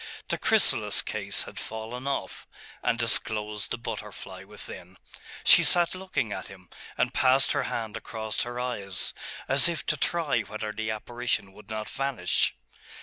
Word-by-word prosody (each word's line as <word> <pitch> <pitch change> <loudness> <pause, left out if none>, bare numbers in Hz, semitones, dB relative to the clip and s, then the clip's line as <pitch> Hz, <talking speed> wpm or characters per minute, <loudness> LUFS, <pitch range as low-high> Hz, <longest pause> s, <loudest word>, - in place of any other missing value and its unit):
The - - 0
chrysalis - - +4
case - - -2
had - - -8
fallen 115 +4 -5
off, 140 - -3 0.3
and 115 - +2
disclosed 105 -2 0
the - - -2
butterfly 105 -4 -6
within. 95 -2 -10 0.5
She - - +8
sat 175 -1 +4
looking 185 - -2
at 95 - -4
him, 95 -3 -14 0.3
and - - +2
passed 130 +1 +5
her 140 - +1
hand 110 -3 -3
across 110 -2 -3
her 120 0 -3
eyes, 100 -7 -2 0.3
as 135 +5 +6
if 165 -4 -3
to 150 - +1
try 160 -5 +1
whether 110 0 -4
the 110 +1 -3
apparition 110 -2 -2
would 105 +2 -15
not 110 -1 -3
vanish. 135 -10 +1
110 Hz, 150 wpm, -28 LUFS, 105-130 Hz, 0.5 s, She